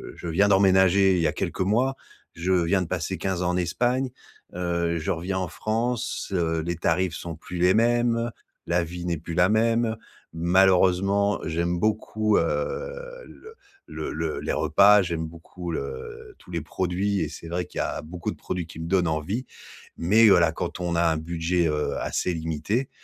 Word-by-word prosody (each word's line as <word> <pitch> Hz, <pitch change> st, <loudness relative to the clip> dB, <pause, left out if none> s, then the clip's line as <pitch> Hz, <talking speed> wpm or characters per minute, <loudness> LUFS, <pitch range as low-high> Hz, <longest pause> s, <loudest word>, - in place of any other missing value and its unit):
je 85 Hz, -, -6 dB
viens 95 Hz, +5 st, +3 dB
d'emménager 95 Hz, -1 st, +5 dB
il -, -, +1 dB
y 80 Hz, -, +3 dB
a -, -, -1 dB
quelques -, -, -4 dB
mois, 120 Hz, +8 st, +1 dB, 0.4 s
je 90 Hz, +3 st, 0 dB
viens 90 Hz, +2 st, +2 dB
de 90 Hz, -, -3 dB
passer 90 Hz, +1 st, -3 dB
15 95 Hz, +1 st, -2 dB
ans 90 Hz, -, +1 dB
en 90 Hz, -, 0 dB
Espagne, 125 Hz, +9 st, 0 dB, 0.4 s
heu. 85 Hz, -1 st, -1 dB
Je 80 Hz, -, -2 dB
reviens 90 Hz, +3 st, -2 dB
en 90 Hz, -2 st, -3 dB
France, 115 Hz, +2 st, -2 dB
heu, 80 Hz, -3 st, 0 dB
les 85 Hz, +1 st, -3 dB
tarifs 85 Hz, 0 st, 0 dB
sont 85 Hz, 0 st, -6 dB
plus 90 Hz, +3 st, -8 dB
les 90 Hz, +2 st, +4 dB
mêmes, 120 Hz, 0 st, +2 dB, 0.3 s
la 85 Hz, 0 st, +1 dB
vie 90 Hz, +1 st, -7 dB
n'est 85 Hz, -2 st, -1 dB
plus 80 Hz, +2 st, -7 dB
la 90 Hz, +2 st, +4 dB
même. 115 Hz, +1 st, +2 dB, 0.4 s
Malheureusement, 95 Hz, +3 st, +3 dB
j'aime 85 Hz, +2 st, -1 dB
beaucoup, 110 Hz, +1 st, +1 dB
heu, -, -, +3 dB, 0.8 s
le 445 Hz, 0 st, -13 dB, 0.3 s
le -, -, -5 dB
le 80 Hz, 0 st, -3 dB
les -, -, -3 dB
repas, 105 Hz, 0 st, +5 dB
j'aime 85 Hz, -2 st, -3 dB
beaucoup 85 Hz, +2 st, -8 dB
le 70 Hz, -4 st, -6 dB
tous -, -, -19 dB
les 85 Hz, -2 st, -3 dB
produits 95 Hz, +5 st, -1 dB
et 80 Hz, -, -1 dB
c'est 80 Hz, +1 st, -9 dB
vrai 90 Hz, +1 st, -2 dB
qu'il -, -, -12 dB
y -, -, +1 dB
a -, -, -3 dB
beaucoup 85 Hz, +2 st, -5 dB
de -, -, -8 dB
produits 90 Hz, -2 st, -4 dB
qui 80 Hz, 0 st, -11 dB
me 80 Hz, -, -5 dB
donnent 90 Hz, -1 st, +2 dB
envie. 80 Hz, -, -2 dB, 0.5 s
Mais, 110 Hz, +7 st, +5 dB
voilà, 85 Hz, -4 st, +5 dB
quand 80 Hz, -, -5 dB
on 90 Hz, -1 st, -1 dB
a 85 Hz, -, +2 dB
un 80 Hz, -2 st, +2 dB
budget, 85 Hz, +2 st, 0 dB
heu, 75 Hz, -1 st, -1 dB
assez 90 Hz, -, -1 dB
limité. 80 Hz, -, -2 dB
90 Hz, 190 wpm, -25 LUFS, 85-100 Hz, 0.8 s, d'emménager